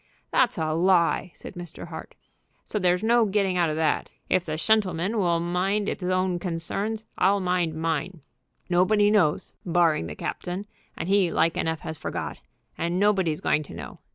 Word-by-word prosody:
"That's 250 -2 +3
a 155 -1 0
lie," 175 +1 +3
said - - -10
Mr. 175 -3 -8
Hart; - - -9 0.5
"so 210 - -2
there's 180 +1 +2
no 235 +1 +4
getting 195 -2 +1
out 175 -2 +2
of 155 - -2
that. 160 -1 0 0.2
If 185 -1 +2
the 155 0 -2
shentleman 195 +1 +1
will 170 -3 +2
mind 185 +4 0
'is - - -3
own 185 0 0
concerns 195 +6 -3
I'll 200 +2 +4
mind 180 -3 0
mine. 165 +1 -2 0.5
Nobody 205 +4 +3
knows, 180 -8 +2
barring 165 - +2
the 75 - -7
captain, 180 +3 -4 0.3
and - - -4
he 195 -2 +3
like 165 0 +2
enough 160 -1 -1
has 160 -2 -6
forgot, - - -4 0.4
and 170 +2 0
nobody's 190 -6 +2
going 150 - +2
to 145 - -10
know. 75 -6 -8
180 Hz, 170 wpm, -26 LUFS, 165-195 Hz, 0.5 s, no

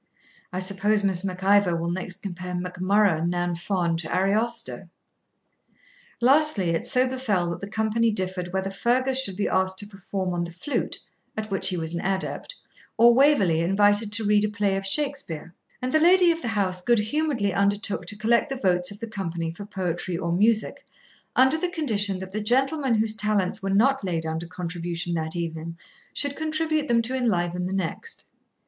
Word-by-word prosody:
'I 185 - -3
suppose 205 +2 +1
Miss 190 -2 +2
Mac 185 -1 -4
Ivor 200 -3 +4
will 170 +1 -2
next 180 0 -5
compare 180 -2 -5
Mac 180 0 -5
Murrough 195 -4 +3
nan 175 0 0
Fonn 170 -1 -1
to 165 - -4
Ariosto!' 210 0 -1 1.3
Lastly, 260 - +3
it 165 - -2
so 255 0 +3
befell 215 -10 -1
that 170 - -6
the 200 - -6
company 220 +1 +1
differed 185 -3 -2
whether 190 +1 -2
Fergus 255 +6 +1
should 195 -8 -1
be 205 - 0
asked 190 0 +1
to 205 - -2
perform 195 -2 -4
on 175 - -1
the 170 - -3
flute, 180 - -3 0.4
at 215 -1 -4
which 195 -1 +1
he 185 - -2
was 160 0 -3
an 170 - -3
adept, 195 - -2 0.4
or 235 +1 +7
Waverley 235 - +4
invited 205 +4 +3
to 225 +2 0
read 210 0 +3
a 210 - +1
play 205 -2 0
of 195 0 -3
Shakspeare; 270 - -2 0.3
and 255 - -1
the 310 - +5
lady 355 +1 +6
of 330 0 -3
the - - -4
house 195 -4 0
good 240 +5 +3
humouredly 225 - 0
undertook 200 -1 0
to 205 - -4
collect 235 +6 +2
the 270 - -2
votes 180 -7 +1
of 205 - -9
the 230 - -5
company 170 -6 -4
for 200 +5 -9
poetry 180 -3 -3
or 170 -1 -2
music, 215 +5 +1 0.5
under 265 +5 +4
the 360 - -1
condition 215 - 0
that 190 0 -8
the 215 +2 -3
gentleman 265 +3 +1
whose 220 0 +2
talents 210 -4 0
were 195 - -3
not 240 +6 +3
laid 170 -4 -2
under 160 +1 -3
contribution 175 0 -4
that 160 0 -3
evening 165 -1 -4 0.3
should 285 -1 -1
contribute 310 -1 -1
them 235 -2 +3
to 255 +3 -1
enliven 180 -8 0
the - - -5
next. 195 - -1
200 Hz, 185 wpm, -25 LUFS, 180-235 Hz, 1.3 s, or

